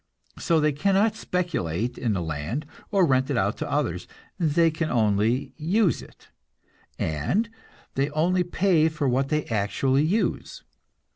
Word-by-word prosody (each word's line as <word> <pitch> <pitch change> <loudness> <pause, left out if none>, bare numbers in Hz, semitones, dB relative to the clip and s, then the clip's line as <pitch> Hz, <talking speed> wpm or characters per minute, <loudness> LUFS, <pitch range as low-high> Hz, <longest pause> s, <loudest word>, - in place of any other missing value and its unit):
So 165 -2 +2
they 150 0 +3
cannot 195 +8 +2
speculate 125 - -2
in 115 -5 -1
the 90 -3 -2
land 80 - -3 0.2
or 195 -3 +3
rent 130 -2 +2
it 140 - 0
out - - +1
to - - -4
others; - - -1 0.3
they 165 0 +3
can 155 0 -2
only 110 +2 +1
use 180 +4 +1
it, - - -17 0.7
and 80 - 0 0.5
they 140 +2 0
only 175 +5 +1
pay 175 -2 +2
for 155 -2 -2
what 135 +2 +1
they 150 -1 0
actually 120 +6 +1
use. 195 +8 -1
150 Hz, 145 wpm, -25 LUFS, 120-175 Hz, 0.7 s, they